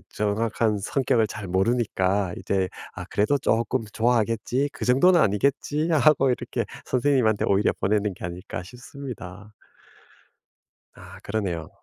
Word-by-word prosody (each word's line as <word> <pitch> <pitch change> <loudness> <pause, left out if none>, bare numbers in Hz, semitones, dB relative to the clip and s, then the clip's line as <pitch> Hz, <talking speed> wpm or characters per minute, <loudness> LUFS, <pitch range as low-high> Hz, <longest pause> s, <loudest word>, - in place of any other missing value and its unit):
정확한 105 +1 0
성격을 115 +2 +1
잘 105 -1 -7
모르니까 95 -1 +1
이제 95 -1 -1 0.3
아 - - -7
그래도 110 +8 +2
'쪼끔 115 -1 0
좋아하겠지? 120 +3 +1
그 - - -7
정도는 170 +9 +5
아니겠지?' 140 - +1
하고 150 -3 +4
이렇게 125 - -2 0.2
'선생님한테 125 -5 +2
오히려 100 +1 +3
보내는 105 0 +1
게 - - -8
아닐까?' 90 +1 -6
싶습니다. 105 -3 -10 1.4
아 - - -13
그러네요. 95 -6 -3
110 Hz, 310 characters per minute, -25 LUFS, 100-130 Hz, 1.4 s, 정도는